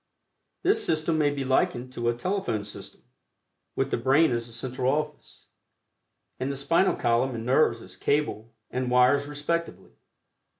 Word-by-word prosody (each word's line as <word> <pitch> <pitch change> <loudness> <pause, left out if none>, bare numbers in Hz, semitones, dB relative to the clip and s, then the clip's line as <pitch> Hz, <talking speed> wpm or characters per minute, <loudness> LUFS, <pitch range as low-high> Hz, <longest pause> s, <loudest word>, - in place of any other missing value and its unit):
This 410 +4 +3
system 155 0 +1
may 145 -1 +3
be 140 -1 -3
likened 130 -1 0
to 120 -1 -1
a 120 - 0
telephone 120 - -2
system, 105 - -10 0.7
with 135 0 -1
the - - +1
brain 135 +6 +3
as 120 0 -1
the - - -11
central 125 +2 -1
office, 150 0 -5 0.9
and 130 +2 -1
the - - -4
spinal 165 +7 +2
column 120 +2 +1
and 115 0 -5
nerves 125 -3 +2
as - - -10
cable 140 -6 -1 0.2
and 125 0 -2
wires 125 +3 +4
respectively. 150 +3 -3
135 Hz, 155 wpm, -26 LUFS, 120-150 Hz, 0.9 s, wires